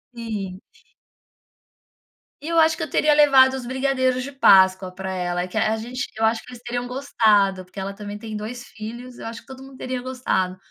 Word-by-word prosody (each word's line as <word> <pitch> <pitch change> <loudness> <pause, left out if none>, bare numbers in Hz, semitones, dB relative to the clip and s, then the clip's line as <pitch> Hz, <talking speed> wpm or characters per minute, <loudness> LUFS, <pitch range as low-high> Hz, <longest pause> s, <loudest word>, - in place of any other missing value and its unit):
Sim. 205 -5 -5 1.8
E - - -6
eu 335 0 +2
acho 320 0 +5
que - - -8
eu - - -3
teria 300 -1 +3
levado 270 -3 +6
os 255 -2 -5
brigadeiros 260 -1 0
de 280 - -6
páscoa 190 -7 +5
pra 190 +1 -6
ela, 180 0 -2
que 185 - -13
a 220 +1 +1
gente 245 +4 -5
eu 225 - +2
acho 220 0 +1
que - - -15
eles 245 - -11
teriam 245 0 -3
gostado, 210 -8 +2
porque 185 +2 -11
ela 195 +1 -4
também 205 0 -7
tem 220 0 -7
2 235 +4 -6
filhos, 235 +3 -9
eu - - -7
acho 230 0 -7
que - - -27
todo 265 -1 -10
mundo 270 0 -12
teria 255 -1 -4
gostado. 245 -8 -1
235 Hz, 200 wpm, -23 LUFS, 195-260 Hz, 1.8 s, levado